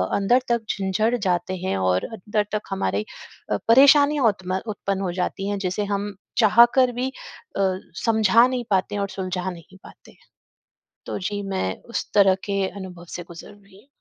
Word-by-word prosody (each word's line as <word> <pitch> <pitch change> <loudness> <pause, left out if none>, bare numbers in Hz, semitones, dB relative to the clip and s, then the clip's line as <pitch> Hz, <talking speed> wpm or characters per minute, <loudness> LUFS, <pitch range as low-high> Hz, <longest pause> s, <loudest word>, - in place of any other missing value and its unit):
अंदर 240 +6 +3
तक 235 -1 +2
झिंझड़ 200 +4 0
जाते 185 -3 -1
हैं 185 - -2
और 95 -1 +1
अंदर 210 -1 -2
तक 210 - 0
हमारी 105 - -1 0.5
अ, 105 - +2
परेशानियाँ 285 +3 +6
उत्म 185 -2 -1
उत्पन्न 200 -2 -3
हो 185 -2 -1
जाती 195 +2 -3
हैं 205 - -1
जिसे 185 +3 -2
हम 205 +1 -3 0.2
चाह 225 +1 +7
कर 255 -2 +4
भी 250 +2 -2
अ, 270 - -9 0.4
समझा 225 +1 +5
नहीं 255 -1 -2
पाते 195 +1 0
हैं 205 - -1
और 200 - -2
सुलझा 185 -1 -3
नहीं 180 +1 -11
पाते - - -16
हैं। - - -25 0.9
तो - - -4
जी, 205 +2 -3
मैं 190 - -2
उस 235 - -5
तरह 195 -2 +5
के 200 -1 -1
अनुभव 180 -2 -9
से 175 - -5
गुज़र 170 -1 -11
रही 200 -1 -20
हूँ। 265 - -28
200 Hz, 180 wpm, -23 LUFS, 185-225 Hz, 0.9 s, चाह